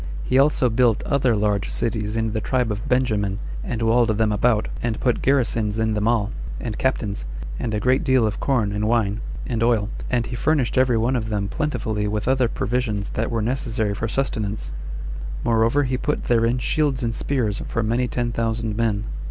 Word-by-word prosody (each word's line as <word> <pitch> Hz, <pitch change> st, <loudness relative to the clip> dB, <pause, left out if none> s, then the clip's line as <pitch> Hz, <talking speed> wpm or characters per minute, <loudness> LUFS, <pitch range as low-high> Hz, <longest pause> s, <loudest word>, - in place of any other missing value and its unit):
He 130 Hz, -, +2 dB
also 140 Hz, -2 st, +4 dB
built 115 Hz, -1 st, +3 dB
other 135 Hz, -5 st, +2 dB
large 105 Hz, -2 st, 0 dB
cities 110 Hz, -1 st, -2 dB
in 110 Hz, -1 st, 0 dB
the 110 Hz, -, -1 dB
tribe 125 Hz, -1 st, 0 dB
of 105 Hz, +1 st, -4 dB
Benjamin, 105 Hz, -6 st, +1 dB, 0.3 s
and 115 Hz, -2 st, -3 dB
walled 115 Hz, +1 st, +4 dB
them 110 Hz, -1 st, +2 dB
about, 110 Hz, +1 st, +2 dB
and 115 Hz, -2 st, -1 dB
put 125 Hz, -2 st, +1 dB
garrisons 115 Hz, -6 st, +1 dB
in 110 Hz, -1 st, +1 dB
them 105 Hz, +1 st, 0 dB
all, 115 Hz, -2 st, +1 dB, 0.3 s
and 115 Hz, -3 st, -4 dB
captains, 110 Hz, -6 st, -1 dB, 0.4 s
and 115 Hz, -, -2 dB
a -, -, 0 dB
great 130 Hz, +5 st, +2 dB
deal 130 Hz, -4 st, +3 dB
of 105 Hz, -, -2 dB
corn, 120 Hz, -7 st, +1 dB
and 105 Hz, +1 st, -1 dB
wine, 110 Hz, -2 st, +1 dB, 0.2 s
and 115 Hz, -3 st, -2 dB
oil, 115 Hz, -3 st, +2 dB, 0.2 s
and 120 Hz, -2 st, +1 dB
he 120 Hz, -, -5 dB
furnished 140 Hz, -1 st, +1 dB
every 125 Hz, -2 st, +3 dB
one 120 Hz, +4 st, +1 dB
of 110 Hz, -3 st, -2 dB
them 100 Hz, -2 st, -1 dB
plentifully 110 Hz, -6 st, -2 dB
with 105 Hz, +1 st, -2 dB
other 130 Hz, -2 st, +3 dB
provisions 110 Hz, -4 st, -2 dB
that -, -, -1 dB
were 115 Hz, -2 st, -1 dB
necessary 115 Hz, -3 st, -1 dB
for 110 Hz, +2 st, -2 dB
sustenance; 110 Hz, -4 st, -2 dB, 0.7 s
moreover, 115 Hz, +5 st, +3 dB
he 130 Hz, -1 st, -1 dB
put 150 Hz, +3 st, -1 dB
therein 115 Hz, +1 st, +2 dB
shields 135 Hz, +1 st, 0 dB
and 115 Hz, -1 st, 0 dB
spears 115 Hz, -6 st, -1 dB
for 115 Hz, -, -1 dB
many 120 Hz, +3 st, +1 dB
ten 120 Hz, -1 st, -1 dB
thousand 115 Hz, -2 st, -1 dB
men. 110 Hz, -2 st, 0 dB
115 Hz, 190 wpm, -23 LUFS, 105-125 Hz, 0.7 s, also